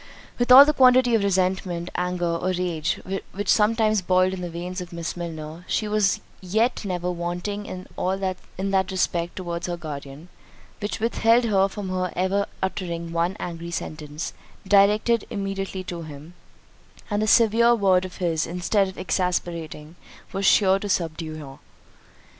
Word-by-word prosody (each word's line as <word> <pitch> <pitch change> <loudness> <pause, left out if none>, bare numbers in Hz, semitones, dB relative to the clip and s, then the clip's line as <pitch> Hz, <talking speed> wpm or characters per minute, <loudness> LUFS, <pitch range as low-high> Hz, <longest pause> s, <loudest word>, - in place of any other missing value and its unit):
With 245 +1 +1
all 270 +3 +12
that 300 0 0
quantity 255 -1 +6
of 220 -3 +3
resentment, 185 -2 0
anger, 180 0 -1
or 175 - -2
rage, 170 -4 -1 0.3
which 205 +1 -4
sometimes 215 -1 +3
boiled 185 +1 +2
in 185 - -5
the 175 - -4
veins 180 +2 -5
of 180 0 -8
Miss 170 -1 -4
Milner, 165 -1 -7
she 215 - -1
was 210 -2 +1 0.2
yet 220 +8 0
never 180 -2 -2
wanting 175 +4 -4
in 185 +1 -4
that 190 -1 +1
respect 175 -2 -1
towards 175 -1 -4
her 175 -1 -3
guardian, 150 0 -8 0.5
which 205 +1 -3
with 230 +2 -1
held 230 +2 +5
her 195 -4 +3
from 195 -1 -6 0.2
ever 195 +2 0 0.2
uttering 170 -3 -3
one 170 +4 0
angry 170 -1 -5
sentence, 155 -2 -5 0.3
directed 210 +3 +4
immediately 195 -1 -4
to 175 -2 -6
him; 155 +1 -10 0.8
and 205 0 +1
a 215 - 0
severe 235 +2 +5
word 190 -4 +3
of 185 -1 -8
his, 165 -4 0
instead 180 +4 +1
of 190 - -9
exasperating, 170 -4 -3 0.4
was 195 0 0
sure 195 -2 +5
to 205 - -5
subdue 165 -3 -2
her. 140 -3 -10
185 Hz, 155 wpm, -24 LUFS, 170-200 Hz, 0.8 s, all